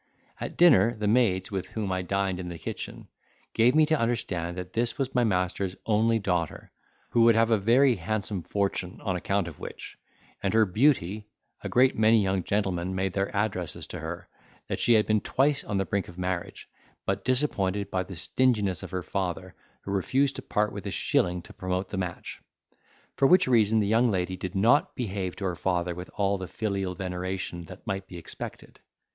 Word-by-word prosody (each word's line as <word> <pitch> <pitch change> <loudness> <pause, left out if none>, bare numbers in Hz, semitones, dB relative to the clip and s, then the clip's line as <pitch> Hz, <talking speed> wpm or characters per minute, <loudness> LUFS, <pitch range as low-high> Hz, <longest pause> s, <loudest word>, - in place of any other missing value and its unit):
At - - -6
dinner 120 - +6
the 105 -1 -2
maids, 105 -5 +2
with 95 -1 -3
whom 105 -4 -3
I 95 0 0
dined 95 0 -1
in 90 -1 -5
the 85 - -6
kitchen, - - -7 0.5
gave 120 +4 +4
me 155 0 +6
to 155 -1 +1
understand 90 -7 -1
that 90 0 -6
this 120 +1 0
was 135 -2 -2
my 125 - +3
master's 90 -2 0
only 115 +1 +3
daughter, 90 -6 -2 0.4
who 120 - +3
would 115 0 +6
have 115 +1 +3
a 110 - +4
very 125 +6 +4
handsome 105 -3 -2
fortune, 95 0 -2
on 95 -4 -1
account 100 +1 0
of 85 - -9
which, - - -9 0.4
and 100 +2 0
her 110 -1 +6
beauty, 105 - +1 0.4
a - - -3
great 130 +1 +4
many 110 +1 +5
young 95 -1 0
gentlemen 95 -3 -1
made 95 -1 -1
their 100 +1 0
addresses 100 -4 -2
to - - -7
her—that - - -8
she 120 - +4
had 110 -1 +4
been 110 -1 +2
twice 140 +2 +1
on 105 - -2
the 95 - 0
brink 100 -1 -1
of 90 - -12
marriage, 90 -1 -4 0.4
but 100 0 -1
disappointed 105 -7 +1
by 95 - 0
the 95 0 -7
stinginess 105 -2 +1
of 95 - -7
her 90 0 -3
father, 95 -1 -3 0.3
who 100 - -6
refused 130 +8 +1
to - - -5
part 105 0 0
with - - -6
a - - -3
shilling 90 0 0
to - - -13
promote 95 +1 -3
the 100 - -4
match; 90 -2 -5 0.7
for 135 - +4
which 185 +3 +5
reason 110 -3 +4
the 105 - +2
young 115 +4 +3
lady 95 -2 -1
did 95 +1 -6
not 130 - +3
behave 95 -7 -3
to 100 - -5
her 90 -2 -1
father 90 0 -1
with 90 +1 -8
all 100 -1 +1
the 95 - -5
filial 100 -4 -2
veneration 90 -1 -4
that - - -12
might 95 0 -3
be 90 - -9
expected. 85 - -8
100 Hz, 195 wpm, -27 LUFS, 90-115 Hz, 0.7 s, dinner